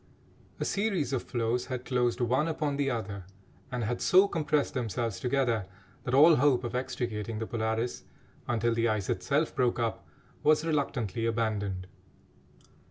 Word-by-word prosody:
A - - -1
series 195 - 0
of 130 - 0
floes 120 +1 -1
had 125 -2 -4
closed 125 -1 0
one 130 +6 +2
upon 150 -3 -1
the 140 -1 0
other, 105 -6 -4 0.5
and 125 -1 -2
had 120 +3 -2
so 190 +2 +6
compressed 150 -5 0
themselves 115 -4 -2
together, 120 -5 0 0.4
that 125 - 0
all 155 +3 +8
hope 130 -2 +3
of 120 - -4
extricating 115 -4 -3
the 110 - -3
Polaris 110 +1 -2 0.4
until 120 -1 +1
the 115 0 +1
ice 105 -3 -1
itself 140 - 0
broke 125 -4 +2
up 115 -2 -2 0.3
was 155 +1 +3
reluctantly 125 - -1
abandoned. 105 -5 -1
120 Hz, 150 wpm, -29 LUFS, 115-140 Hz, 0.5 s, all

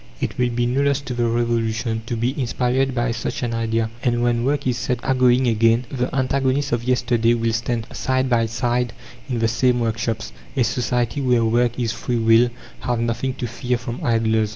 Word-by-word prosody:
It - - -3
will 125 -1 +2
be 120 0 0
no 125 +3 +1
loss 140 -1 +2
to 130 -2 -5
the 120 -1 0
Revolution 115 -1 0
to 120 - -2
be 120 +3 0
inspired 130 +2 0
by 120 0 0
such 115 +2 -3
an 120 -1 -1
idea, 115 -1 -1
and, 120 -2 +1
when 120 -1 +1
work 140 +3 0
is 125 -1 0
set 125 -1 -1
agoing 130 -1 +3
again, 115 +2 +3
the 125 -2 -1
antagonists 135 +1 +1
of 120 0 0
yesterday 120 -2 +2
will 115 -1 0
stand 115 0 -1
side 130 0 0
by 115 -2 +2
side 120 +1 -1 0.4
in 125 - -1
the 115 0 +2
same 125 +2 +2
workshops. 115 -1 -2 0.3
A 130 - +4
society 125 +3 -1
where 125 -3 +2
work 120 +1 +1
is 115 -2 0
free 120 +1 -2
will 115 +1 +5 0.3
have 120 -2 -1
nothing 115 +3 -1
to - - -4
fear 120 +1 -2
from 120 0 -6
idlers. 110 -2 +2
120 Hz, 200 wpm, -21 LUFS, 115-125 Hz, 0.4 s, will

